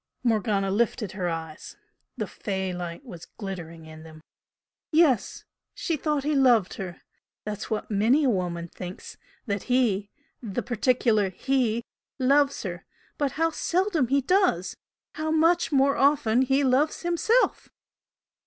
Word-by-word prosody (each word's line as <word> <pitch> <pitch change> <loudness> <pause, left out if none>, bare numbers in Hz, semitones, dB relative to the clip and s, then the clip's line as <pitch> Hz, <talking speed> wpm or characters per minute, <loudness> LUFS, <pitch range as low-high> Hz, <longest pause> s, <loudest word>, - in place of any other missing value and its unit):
Morgana 210 -4 +1
lifted 215 -1 0
her 185 -2 -2
eyes. 160 -2 -7 0.4
The - - -2
"fey" 190 -3 -4
light 175 +7 -6
was 175 -9 -10
glittering 170 -5 -7
in 155 0 -11
them. 155 -1 -13 0.7
"Yes! 305 - +2 0.3
She 335 - -1
thought 300 -1 -1
he 300 +2 0
loved 245 -8 +4
her! 185 -3 -7 0.4
That's 210 0 -5
what 215 0 -3
many 225 +9 +3
a 270 - +3
woman 175 -4 -2
thinks 180 +1 -9 0.3
that 200 -4 -3
'he' 215 -6 +2 0.3
the 210 -6 -4
particular 235 -4 +1
'he' 235 +2 0 0.3
loves 275 +1 +2
her! 175 -4 -5 0.4
But 285 -3 0
how 330 +1 +1
seldom 345 -4 0
he 275 +3 +2
does! 265 - +1 0.4
How 310 0 -4
much 330 +2 +3
more 275 0 +3
often 270 -4 +3
he 270 +2 +2
loves 275 +6 +1
himself!" 345 +8 +1
235 Hz, 135 wpm, -26 LUFS, 190-280 Hz, 0.7 s, loved